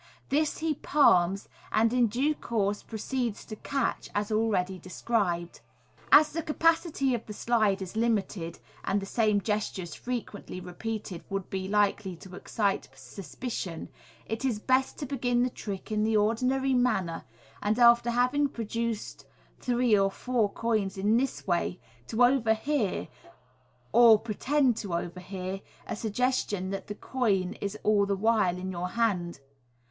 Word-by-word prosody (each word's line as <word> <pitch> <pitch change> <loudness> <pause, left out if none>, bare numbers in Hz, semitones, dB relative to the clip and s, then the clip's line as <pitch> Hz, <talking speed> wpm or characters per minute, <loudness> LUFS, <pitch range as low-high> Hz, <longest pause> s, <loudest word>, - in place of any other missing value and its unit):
This 300 +2 +1
he 320 -1 0
palms, 195 -11 +3 0.2
and 225 +2 +3
in 245 -2 +4
due 265 +8 +1
course 210 -7 -1
proceeds 235 0 -3
to 215 - -7
catch, 270 +3 -2
as 205 +1 -1
already 195 -4 +1
described. 180 -2 -2 0.5
As 305 0 +8
the 330 - -2
capacity 320 -3 +1
of 235 - -3
the 210 - -6
slide 210 -4 +1
is 185 +2 -9
limited, 205 -7 -1 0.3
and 200 - +1
the 195 - -5
same 215 0 +2
gestures 195 -5 -2
frequently 220 -2 -5
repeated 185 +1 -5
would 195 -2 -4
be 190 -1 -3
likely 205 -2 +1
to 180 +2 -12
excite 200 - -1
suspicion, 180 - -6 0.4
it 225 +3 -4
is 255 -5 +1
best 260 +4 +1
to 290 - -4
begin 245 -2 +1
the 250 - 0
trick 200 -1 -6
in 215 0 +1
the 220 0 +2
ordinary 255 +5 +1
manner, 215 -10 +1 0.4
and 210 +2 +1
after 235 0 +6
having 250 +5 +2
product 230 -5 -7
d 230 0 +1 0.6
three 245 -3 +2
or 195 -1 +3
four 230 +1 0
coins 215 -5 -1
in 205 +3 +2
this 265 +1 -2
way, 175 0 0 0.3
to 230 +2 +2
overhear, 245 -1 +2 0.8
or 235 -2 +8
pretend 250 +4 +1
to 195 -6 -3
overhear, 185 +2 -5 0.2
a - - -4
suggestion 210 -3 -1
that 195 - -5
the 205 - -5
coin 205 -7 0
is 200 +1 -3
all 205 -1 +3
the 200 - +1
while 210 -4 +2
in 185 +1 -4
your 180 0 -3
hand. 180 -8 0
215 Hz, 150 wpm, -28 LUFS, 195-245 Hz, 0.8 s, As